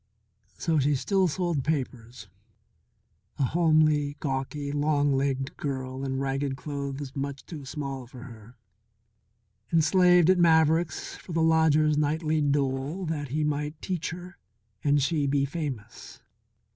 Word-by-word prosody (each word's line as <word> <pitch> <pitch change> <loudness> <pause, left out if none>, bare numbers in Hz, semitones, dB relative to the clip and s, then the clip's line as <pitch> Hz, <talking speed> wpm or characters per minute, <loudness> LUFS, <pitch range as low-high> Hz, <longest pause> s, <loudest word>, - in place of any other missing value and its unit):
So 160 -2 +1
she 145 +1 +2
still 190 +7 +1
sold 170 -4 -1
papers, 125 -6 -4 1.1
a - - +1
homely, 155 -1 +2
gawky, 140 +1 -3
long 145 -1 +1
legged 135 0 -1
girl 130 -2 -4
in 135 -1 -2
ragged 135 0 -1
clothes 140 -1 -5
much 140 0 -4
too 150 -5 -8
small 135 -2 -5
for 125 0 -11
her, 115 -1 -13 1.1
and 165 -1 +3
slaved 180 0 +5
at 185 - +2
Maverick's 160 -1 +2
for 175 - -10
the 165 0 +2
lodger's 155 -2 +3
nightly 155 +1 0
dole 140 +4 -1
that 155 -3 -3
he 150 +4 -1
might 150 +1 -2
teach 180 -2 -3
her 180 +2 -9 0.4
and 145 0 +3
she 145 0 +1
be 140 0 +2
famous. 140 -8 -6
145 Hz, 130 wpm, -27 LUFS, 135-160 Hz, 1.1 s, slaved